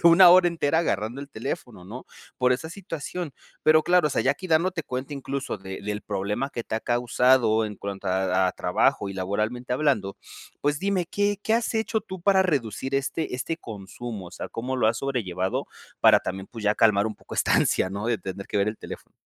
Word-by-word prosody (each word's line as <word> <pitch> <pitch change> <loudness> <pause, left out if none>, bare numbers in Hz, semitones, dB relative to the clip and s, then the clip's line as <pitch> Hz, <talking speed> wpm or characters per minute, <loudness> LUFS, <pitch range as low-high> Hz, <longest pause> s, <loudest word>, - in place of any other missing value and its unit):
una 175 +1 +9
hora 180 -1 +7
entera 160 -2 +1
agarrando 115 - -1
el 140 - -8
teléfono, 115 -5 -6
¿no? 120 +7 -9 0.3
Por 125 0 +4
esa 160 +6 -3
situación, 170 -3 -5 0.3
pero, 155 0 +5
claro, 175 -1 +4
o - - -7
sea, - - +1
ya 135 - +3
aquí 185 +6 -8
dándote 165 +2 +2
cuenta 130 +1 -5
incluso 135 -3 -4
de 95 0 -7
del 105 +1 -3
problema 105 +6 -2
que 120 - -5
te - - -4
ha 110 - -1
causado 120 -2 +3
en 105 - -7
cuanto 100 -1 -5
a 95 0 +2
a - - -3
trabajo 100 - +1
y - - -5
laboralmente 105 +6 -2
hablando, 125 -10 0 0.5
pues, 145 0 +1
dime, 195 -2 +1
¿qué 205 +1 0
qué 220 - 0
has 235 0 0
hecho 220 0 0
tú 190 -4 -8
para 195 -1 +5
reducir 135 - -1
este 140 +1 -1
este 145 +6 -3
consumo? 105 - -7
O - - -17
sea, - - -7
¿cómo 125 +3 -3
lo 125 - +2
has 110 +1 +2
sobrellevado? 95 -9 -2 0.3
Para - - +7
también, 95 +1 -5
pues, 115 -2 -8
ya 105 +1 +3
calmar 105 -1 +4
un 110 - -4
poco - - -11
esta - - +2
ansia, 95 - +2
¿no? 100 +3 -4
De 120 -1 +1
tener 95 +2 -6
que 105 - -3
ver 100 +1 +2
el 105 - -4
teléfono. - - -9
125 Hz, 210 wpm, -25 LUFS, 105-155 Hz, 0.5 s, una